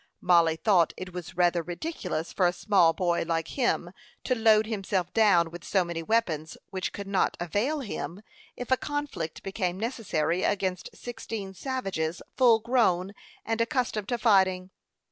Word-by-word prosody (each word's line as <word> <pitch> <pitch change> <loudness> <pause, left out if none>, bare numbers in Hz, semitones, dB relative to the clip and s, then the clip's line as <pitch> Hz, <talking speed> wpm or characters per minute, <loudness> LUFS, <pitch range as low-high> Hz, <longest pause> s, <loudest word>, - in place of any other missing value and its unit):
Mollie 170 -3 +4
thought 170 0 +3
it 185 -1 -7
was 180 0 -7
rather 175 -1 +3
ridiculous 175 - -4
for 185 - +3
a 175 - 0
small 180 -2 +4
boy 170 +1 0
like 165 -1 -1
him 240 -9 0 0.3
to 255 - +1
load 220 -2 +4
himself 195 -4 -2
down 180 -7 +4
with 175 0 -9
so 190 -3 +1
many 170 -1 -4
weapons, 165 -6 -1
which 185 -1 -3
could 200 - -6
not 195 -1 0
avail 210 - -1
him, 200 -4 -6 0.3
if 245 +1 -6
a 260 - +5
conflict 290 - -4
became 190 -2 -2
necessary, 185 -8 -1
against 190 -3 -1
sixteen 225 -5 -6
savages, 190 - -3 0.2
full 245 -4 +6
grown, 210 -6 +1 0.3
and 225 0 0
accustomed 230 -4 -1
to 240 - -1
fighting. 190 -5 +3
190 Hz, 155 wpm, -27 LUFS, 175-225 Hz, 0.3 s, full